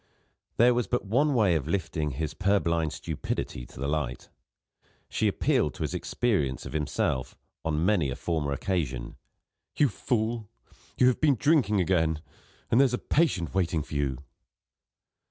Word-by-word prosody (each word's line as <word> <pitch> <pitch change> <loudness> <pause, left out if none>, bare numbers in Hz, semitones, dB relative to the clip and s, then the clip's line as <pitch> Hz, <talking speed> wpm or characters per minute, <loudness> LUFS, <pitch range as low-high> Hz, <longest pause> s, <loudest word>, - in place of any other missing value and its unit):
There 120 +2 +6
was 120 -1 0
but 125 -3 -1
one 135 +8 +2
way 105 -7 +4
of 80 -3 -1
lifting 80 -3 -1
his 75 +3 -3
purblind 85 -5 +1
stupidity 70 -5 -4
to - - -13
the 70 - -2
light. 75 -4 -2 0.8
She - - +1
appealed - - +1
to - - -4
his - - -2
experience 75 - -1
of - - -7
himself, 75 -4 -1 0.3
on 80 0 0
many 90 -8 +2
a 65 - -3
former 80 -4 -2
occasion: 70 -6 -2 0.6
"You 145 - +4
fool, 110 0 -2 0.5
you - - +5
have 125 -1 +3
been 150 -3 +4
drinking 125 -7 +3
again 80 -3 +1 0.5
and 120 - +6
there's 130 -3 +3
a - - -4
patient 120 - +1
waiting 85 -4 +1
for 75 - -11
you." 70 -3 0
85 Hz, 155 wpm, -28 LUFS, 75-115 Hz, 0.8 s, There